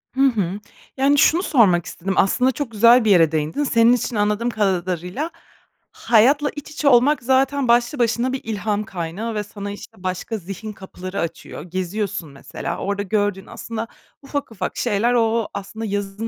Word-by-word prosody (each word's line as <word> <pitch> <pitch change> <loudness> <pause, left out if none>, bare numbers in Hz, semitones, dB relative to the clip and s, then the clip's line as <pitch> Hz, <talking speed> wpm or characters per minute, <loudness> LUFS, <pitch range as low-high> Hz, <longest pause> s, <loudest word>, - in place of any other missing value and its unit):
Hı 265 - 0
hı. 205 -7 0 0.4
Yani, 275 +2 +3
şunu 335 +5 +4
sormak 200 - +3
istedim 190 +3 -4
aslında 250 +6 +3
çok 260 -1 -5
güzel 230 +2 +5
bir 210 - +4
yere 165 -5 +5
değindin. 155 - -1
Senin 230 -3 +4
için 245 -1 -1
anladığım 210 +3 +1
kadarıyla 185 - -1 0.6
hayatla 265 +6 +3
iç 295 +1 -8
içe 300 -1 -2
olmak 260 +2 +4
zaten 265 +2 +2
başlı 240 +3 +2
başına 240 +2 +1
bir 265 - -3
ilham 210 -1 -2
kaynağı 195 +4 -5
ve 210 - -1
sana, 205 0 -7
işte, 200 -2 -11
başka 185 +4 -3
zihin 200 +3 -7
kapıları 190 0 -7
açıyor. 165 -2 -5
Geziyorsun 185 0 -3
mesela, 145 +5 -6
orada 200 +2 -2
gördüğün 205 -1 -1
aslında 230 0 -6 0.3
ufak 285 -2 -4
ufak 220 - -4
şeyler, 235 +1 +1
o 240 - +4
o, 225 -1 +1
aslında 215 +3 -6
yazın 205 +1 -3
215 Hz, 165 wpm, -21 LUFS, 195-245 Hz, 0.6 s, güzel